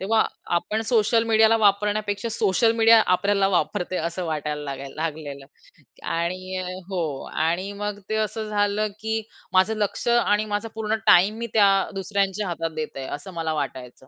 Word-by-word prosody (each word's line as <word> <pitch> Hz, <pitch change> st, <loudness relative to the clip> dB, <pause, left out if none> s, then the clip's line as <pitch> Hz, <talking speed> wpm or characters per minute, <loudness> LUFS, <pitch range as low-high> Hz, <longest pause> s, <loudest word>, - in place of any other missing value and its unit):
तेव्हा 220 Hz, +3 st, +2 dB, 0.3 s
आपण 215 Hz, +5 st, -1 dB
सोशल 225 Hz, 0 st, +3 dB
मीडियाला 220 Hz, 0 st, +5 dB
वापरण्यापेक्षा 205 Hz, +1 st, +1 dB
सोशल 220 Hz, +2 st, +2 dB
मीडिया 225 Hz, 0 st, +7 dB, 0.2 s
आपल्याला 200 Hz, +1 st, +1 dB
वापरते 185 Hz, -1 st, -1 dB
असं 170 Hz, +2 st, -3 dB
वाटायला 150 Hz, -1 st, -3 dB
लागाय 140 Hz, 0 st, -6 dB
लागलेलं. 150 Hz, -3 st, -5 dB, 0.6 s
आणि 185 Hz, +3 st, -2 dB, 0.3 s
हो 190 Hz, -2 st, -2 dB, 0.3 s
आणि 170 Hz, +5 st, 0 dB
मग 205 Hz, 0 st, -4 dB
ते 220 Hz, -, 0 dB
असं 215 Hz, +1 st, -6 dB
झालं 205 Hz, 0 st, +1 dB
की 220 Hz, 0 st, -2 dB, 0.3 s
माझं 190 Hz, +4 st, +3 dB
लक्ष 210 Hz, +3 st, -2 dB
आणि 215 Hz, -3 st, +3 dB
माझा 210 Hz, +2 st, -3 dB
पूर्ण 220 Hz, 0 st, -1 dB
टाईम 205 Hz, +5 st, +6 dB
मी 235 Hz, -, -4 dB
त्या 205 Hz, -3 st, +6 dB, 0.3 s
दुसऱ्यांच्या 195 Hz, +1 st, -1 dB
हातात 165 Hz, -2 st, -3 dB
देत 155 Hz, -1 st, -4 dB
आहे 135 Hz, -, -5 dB
असं 190 Hz, +6 st, -11 dB
मला 165 Hz, -2 st, -2 dB
वाटायचं. 130 Hz, -3 st, -6 dB
200 Hz, 155 wpm, -24 LUFS, 170-215 Hz, 0.6 s, मीडिया